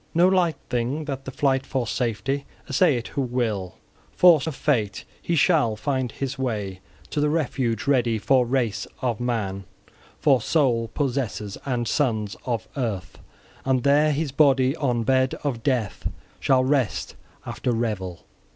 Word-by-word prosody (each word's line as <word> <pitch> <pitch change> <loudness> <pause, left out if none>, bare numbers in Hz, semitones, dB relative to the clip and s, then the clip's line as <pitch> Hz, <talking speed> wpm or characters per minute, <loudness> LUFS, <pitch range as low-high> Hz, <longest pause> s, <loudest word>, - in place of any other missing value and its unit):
No 175 +2 +6
light 180 -4 +3
thing 125 +6 -1
that, 135 -2 -5
the 135 - -5
flight 135 -1 +1
for 130 -3 -2
safety, 125 +4 -2 0.2
essay 140 0 +3
it 120 - -5
who 140 - -2
will! 115 -8 -2 0.4
Forced 165 -5 +6
of 160 - -3
fate, 110 -10 0 0.2
he 170 - -1
shall 145 -8 +3
find 125 +2 -1
his 135 -1 -4
way 105 -7 -2 0.3
to 145 - 0
the 150 - +2
refuge 140 -5 -1
ready 125 -5 +2
for 130 +4 +3
race 120 -5 -1 0.2
of 120 -4 0
man, 105 -6 -2 0.5
for 135 -4 +3
soul 120 -5 +2
possessors, 125 -8 -2
and 120 -3 -1
sons 110 -8 0
of 120 -3 -2
earth; 110 -9 -3 0.4
and 130 -2 +1
there 145 +2 +4
his 150 0 -1
body 135 -1 +4
on 125 -5 0
bed 130 +2 +2
of 130 -6 -2
death 120 -7 -1 0.3
shall 130 -1 +3
rest 130 -3 0 0.3
after 125 - -2
revel. 105 -7 -2
130 Hz, 150 wpm, -24 LUFS, 115-140 Hz, 0.5 s, No